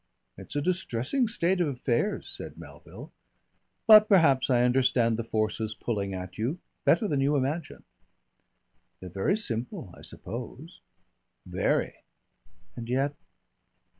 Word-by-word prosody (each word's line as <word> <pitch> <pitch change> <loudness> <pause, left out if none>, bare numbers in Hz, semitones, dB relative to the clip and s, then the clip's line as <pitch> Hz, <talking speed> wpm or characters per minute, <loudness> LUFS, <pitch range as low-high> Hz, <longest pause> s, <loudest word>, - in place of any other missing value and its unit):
"It's - - -10
a 145 - 0
distressing 180 - 0
state 190 -4 +1
of 170 - +2
affairs," 130 - -1
said - - -9
Melville. - - -12 0.7
"But 215 -1 +9
perhaps 145 - +4
I 120 -2 +4
understand 125 -2 +3
the 115 - -3
forces 110 -1 -2
pulling 100 -4 -3
at 90 +1 -7
you 125 +10 -1 0.3
better 220 - +4
than 145 -5 0
you 140 +2 +2
imagine." 140 +4 -2 1.2
"They're 90 - -8
very 95 - 0
simple, 115 - -4
I - - -15
suppose." 125 - -8 0.7
"Very." - - 0 0.8
"And 115 -1 -7
yet 135 +3 +1
130 Hz, 125 wpm, -28 LUFS, 115-170 Hz, 1.2 s, But